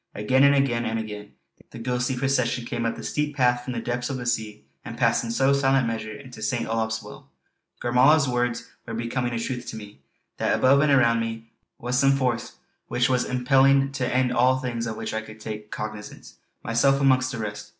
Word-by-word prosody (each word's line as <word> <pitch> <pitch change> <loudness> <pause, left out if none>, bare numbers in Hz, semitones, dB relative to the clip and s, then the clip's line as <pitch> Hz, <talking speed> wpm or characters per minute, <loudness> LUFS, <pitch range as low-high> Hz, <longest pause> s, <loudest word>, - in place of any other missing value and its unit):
Again, 130 +6 +2
and 140 0 +6
again, 130 -4 +1
and 115 -1 -2
again, 105 -2 -7 0.4
the - - -11
ghostly 125 +2 -1
procession 125 -2 0
came 115 0 -2
up - - -2
the - - -9
steep 150 -1 -2
path 125 -2 +2
from 125 - -5
the 115 - -3
depths 120 +2 -3
of 135 - -3
the 125 - -6
sea, 110 -10 -3 0.2
and - - -8
passed - - +2
in 115 - -5
slow 135 +4 +2
silent 135 -2 +2
measure 110 -1 -3
into 125 +4 -11
St. 120 -2 -1
Olaf's 110 0 -2
Well. - - -12 0.5
Gormala's 135 +5 +4
words 120 -1 -1 0.2
were 115 - -5
becoming 120 +2 -2
a 115 - -2
truth 125 +1 -4
to - - -6
me; 105 -8 -10 0.4
that - - +1
above 135 +2 +4
and 150 -1 +3
around 120 -4 +4
me 115 0 -5 0.3
was 125 +1 -1
some 135 0 +4
force 125 -4 -1 0.3
which 125 +2 +1
was 125 -1 +1
impelling 135 +2 +3
to 135 -2 -2
an - - -3
end 130 -1 +2
all 130 +2 +3
things 120 -3 -3
of 110 - -5
which - - -5
I 110 - -1
could 110 0 -12
take 105 -1 -7
cognizance, 105 -1 -8 0.3
myself 135 +4 +2
amongst 130 -2 +3
the 125 - -5
rest. 105 -2 -6
125 Hz, 210 wpm, -25 LUFS, 115-130 Hz, 0.5 s, and